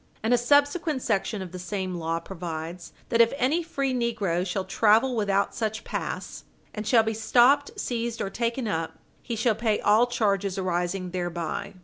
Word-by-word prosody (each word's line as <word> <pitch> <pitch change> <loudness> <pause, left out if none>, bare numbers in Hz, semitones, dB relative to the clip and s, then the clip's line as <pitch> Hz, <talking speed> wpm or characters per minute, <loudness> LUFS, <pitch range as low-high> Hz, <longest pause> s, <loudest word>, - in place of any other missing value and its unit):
And 225 +2 +2
a - - +5
subsequent 285 +3 +2
section 210 -2 -1
of 180 - -9
the 185 - -7
same 185 0 -3
law 165 -1 -2
provides 170 -1 -6 0.2
that 235 -1 +4
if 230 - +5
any 285 +6 +2
free 275 -5 -2
negro 220 -8 0
shall 185 +1 -2
travel 225 +6 +3
without 200 -2 +1
such 220 -1 -3
pass, - - -5 0.3
and 215 0 -5
shall 225 0 +5
be 220 0 -1
stopped, 245 +6 +3
seized, 235 -1 -2
or 195 - -3
taken 235 +2 -2
up, 165 -5 -2 0.3
he 235 - -4
shall 225 +1 +2
pay 220 -1 0
all 215 +4 +4
charges 200 -5 0
arising 180 0 -2
thereby. 175 -1 -4
215 Hz, 170 wpm, -26 LUFS, 185-240 Hz, 0.3 s, a